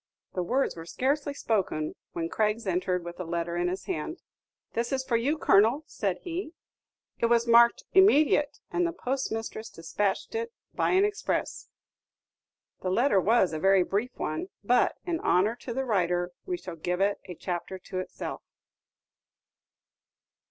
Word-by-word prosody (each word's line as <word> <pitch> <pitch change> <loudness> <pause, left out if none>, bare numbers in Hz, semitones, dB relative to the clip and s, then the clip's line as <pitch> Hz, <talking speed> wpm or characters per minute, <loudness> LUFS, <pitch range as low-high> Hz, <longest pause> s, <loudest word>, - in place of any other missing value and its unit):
The 180 - -1
words 255 +10 0
were 165 0 -9
scarcely 280 - -1
spoken 185 - -1 0.2
when 165 -1 -2
Craggs 215 +4 0
entered 180 -1 0
with 175 +1 -8
a - - -2
letter 170 0 -2
in 175 0 +1
his 185 +2 -3
hand. 155 - -3 0.6
"This 235 +1 -1
is 265 -1 0
for 260 -3 0
you, 270 +7 +1
Colonel," 230 +4 +4
said 195 -9 -2
he; 350 -1 -4 0.7
"it 235 - +3
was 235 0 +3
marked 235 0 +6
'immediate,' 300 -6 +5
and 350 0 +1
the 340 - -3
post 270 -4 -2
mistress 225 0 -4
despatched 195 - -2
it 460 +1 -2 0.2
by - - +1
an 380 +2 +4
express." 415 0 -2 1.1
The 185 - -1
letter 205 0 +3
was 200 -3 +3
a 155 - -2
very 195 +2 +5
brief 215 +8 -2
one; 155 +4 -3 0.2
but, 245 +4 +3
in 340 -2 -1
honor 200 +6 +2
to 245 - -7
the 265 +3 -2
writer, 180 -5 +1 0.2
we 360 -1 -1
shall 180 - -8
give 180 +3 -2
it 200 +1 +2
a 180 - -8
chapter 180 +2 -4
to 185 0 -6
itself. 185 - -5
220 Hz, 160 wpm, -28 LUFS, 180-270 Hz, 1.1 s, marked